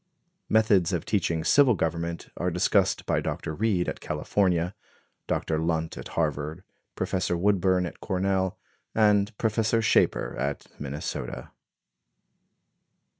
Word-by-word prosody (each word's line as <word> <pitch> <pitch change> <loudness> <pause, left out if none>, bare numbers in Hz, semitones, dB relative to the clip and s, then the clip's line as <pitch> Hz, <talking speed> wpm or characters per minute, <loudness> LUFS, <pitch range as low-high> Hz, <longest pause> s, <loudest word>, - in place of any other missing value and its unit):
Methods 100 -5 +3
of 85 - -1
teaching 85 -6 0
civil 130 - +5
government 85 0 -3
are 90 - -1
discussed 90 0 +2
by - - +1
Dr. 80 - -3
Reed, 95 -1 +1
at - - -3
California; 90 +3 0 0.5
Dr. 80 -1 -1
Lunt, 80 0 -1
at - - -7
Harvard; 75 +2 -1 0.3
Professor 90 -2 -1
Woodburn, 95 -1 +2
at 85 - -7
Cornell, 95 -1 0 0.4
and 105 0 +3
Prof. 110 -1 -1 0.3
Schaper, - - +2
at 70 +1 -2
Minnesota. 70 -3 -5
90 Hz, 115 wpm, -27 LUFS, 80-100 Hz, 0.5 s, civil